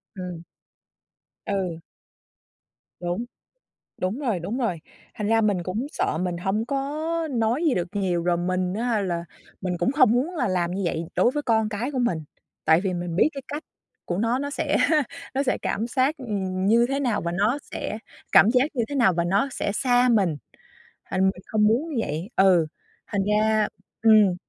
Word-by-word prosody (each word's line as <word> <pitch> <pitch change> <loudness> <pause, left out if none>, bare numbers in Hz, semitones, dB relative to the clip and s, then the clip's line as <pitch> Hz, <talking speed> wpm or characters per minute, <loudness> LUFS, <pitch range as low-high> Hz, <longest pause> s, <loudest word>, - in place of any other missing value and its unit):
Ừm. 180 -3 -6 1.0
Ừ. 185 -5 -2 1.2
Đúng, 175 +6 -2 0.7
đúng 185 +7 -2
rồi, 240 -10 -1
đúng 195 +9 -4
rồi. 225 -10 -1 0.4
Thành 210 - -3
ra 225 0 +4
mình 205 -5 +1
cũng 210 +10 -3
sợ 155 - -1
mình 180 0 -1
hông 195 +5 -1
có 275 +1 -1 0.4
nói 240 +4 +1
gì 305 -6 +3
được 175 -1 -1
nhiều 185 -4 0
rồi 175 0 +2
mình 185 +1 -1
á 230 -1 0
là 175 -3 -2 0.4
mình 185 -2 -2
cũng 245 - +1
hông 230 -7 +6
muốn 275 +9 0
là 265 -9 0
làm 175 -2 0
như 190 +2 -2
vậy 165 -1 -1
đối - - +4
với 295 +3 -2
con 220 -4 +2
cái 220 +5 -3
của 270 - -3
mình. 240 -9 +1 0.5
Tại 160 +1 +5
vì 190 -1 -1
mình 175 -1 -3
biết 195 - +5
cái 275 - -7
cách 295 +3 -4 0.4
của 175 - -2
nó, 230 +4 +1
nó 285 +1 -3
sẽ - - 0 0.6
nó 270 - +2
sẽ 260 - 0
cảm 225 +3 -1
xác 260 +4 +1 0.5
như 235 +3 +5
thế 275 +1 -1
nào 240 -6 0
và 170 - -3
nó 210 +9 +1
sẽ 215 - -5 0.3
cảm 210 - +7
giác 250 +1 +4
như 235 - +2
thế 285 - -5
nào 235 -9 +4
và 170 0 0
nó 200 +9 +2
sẽ 200 - -2
xa 245 0 +3
mình, 195 -10 +3 0.7
thành 190 - -2
mình 190 -1 +1
không 210 -1 +2
muốn 250 +10 +1
như 305 - -5
vậy. 160 +7 -4
Ừ, 185 -4 +5 0.4
thành 200 - -1
ra 215 0 +3 0.3
ừm, 215 -4 +6
210 Hz, 190 wpm, -25 LUFS, 180-245 Hz, 1.2 s, cảm